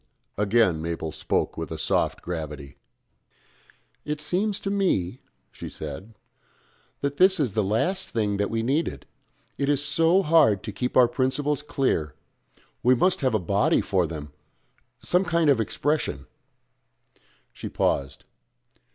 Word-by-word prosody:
Again 105 -5 +2
Mabel 80 -1 -4
spoke - - -2
with - - -4
a - - -4
soft - - 0
gravity. 75 -5 -6 1.3
"It 150 0 -3
seems 190 +7 -1
to 195 - -2
me," 130 - 0 0.3
she - - -8
said, 105 +10 -8 0.9
"that 140 0 -2
this 190 0 +5
is 130 -9 0
the 110 0 +1
last 175 - 0
thing 105 -3 -1
that 100 0 0
we 115 0 -1
needed. 140 +7 -1 0.5
It 140 0 0
is 145 0 +2
so 170 +3 +3
hard 150 - +4
to 110 - -5
keep 125 +5 -2
our 125 -2 +7
principles 140 +3 -1
clear 135 - -1 0.7
we 125 +1 +4
must 185 +8 +2
have 130 -4 +1
a - - +2
body 100 +3 +2
for 90 -4 0
them 75 -3 -8 0.7
some 180 +2 +2
kind 170 -4 +2
of 120 -5 +2
expression 135 - -1 0.7
" - - -38
She - - -7
paused. 70 -1 -1
125 Hz, 145 wpm, -25 LUFS, 95-150 Hz, 1.3 s, our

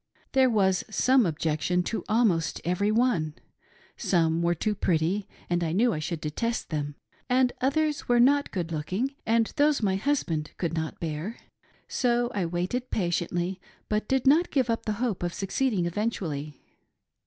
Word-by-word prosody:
There 265 -1 +4
was 190 -5 +2
some 250 +1 +3
objection 160 +2 0
to 225 - -3
almost 210 -8 +2
every 180 +4 +1
one. 215 -10 +1 0.6
Some 165 -2 +2
were 170 0 +2
too 210 +6 0
pretty 185 +1 0 0.2
and 175 0 0
I 160 -1 -1
knew 230 +5 +3
I 155 - -2
should 155 +1 -4
detest 230 +8 -2
them; 145 -2 -2 0.3
and 250 0 +3
others 295 +2 0
were 240 0 +4
not 280 +4 +4
good 170 -3 -3
looking, 185 - -2
and 225 0 +2
those 290 -4 +3
my 190 -2 +2
husband 185 - -1
could 170 -2 -2
not 160 -1 -3
beai*. 165 +7 -4 0.5
So 240 -1 +1
I 190 -4 -1
waited 180 +9 -2
patiently, 175 0 -1 0.3
but 210 0 0
did 265 -1 +1
not 315 +6 +5
give 255 -5 +1
up 225 - -3
the 215 - +1
hope 225 -2 -2
of 175 -1 -2
suc 195 -2 -4
ceeding 215 -7 +1
eventually. 165 - -3
195 Hz, 165 wpm, -27 LUFS, 170-245 Hz, 0.6 s, not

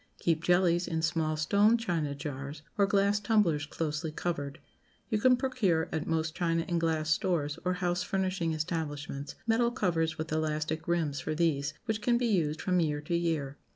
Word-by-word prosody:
Keep 165 -1 0
jellies 175 0 +3
in 160 -2 -2
small 160 -2 0
stone 205 +9 +4
china 165 -10 -1
jars, 140 +1 -6
or 200 -3 +3
glass 200 +1 +3
tumblers 200 -9 +2
closely 155 0 -3
covered. 145 -3 -3 0.5
You 215 - +2
can 250 +3 +5
procure 225 -11 +1
at 160 -1 -2
most 160 -1 0
china 165 -2 0
and 175 -2 0
glass 160 -2 0
stores, 160 -5 0
or 180 0 +1
house 180 -1 -1
furnishing 185 -3 -1
establishments, 145 -3 -4
metal 230 +1 +3
covers 175 -9 0
with 160 0 -4
elastic 155 0 -1
rims 160 -5 0
for 155 - -3
these, 150 -3 0
which 220 -2 -1
can 240 +1 +3
be 245 - 0
used 165 -8 +1
from 180 -1 +2
year 150 -3 +1
to 160 +3 -2
year. 160 -5 -1
165 Hz, 175 wpm, -30 LUFS, 155-185 Hz, 0.5 s, can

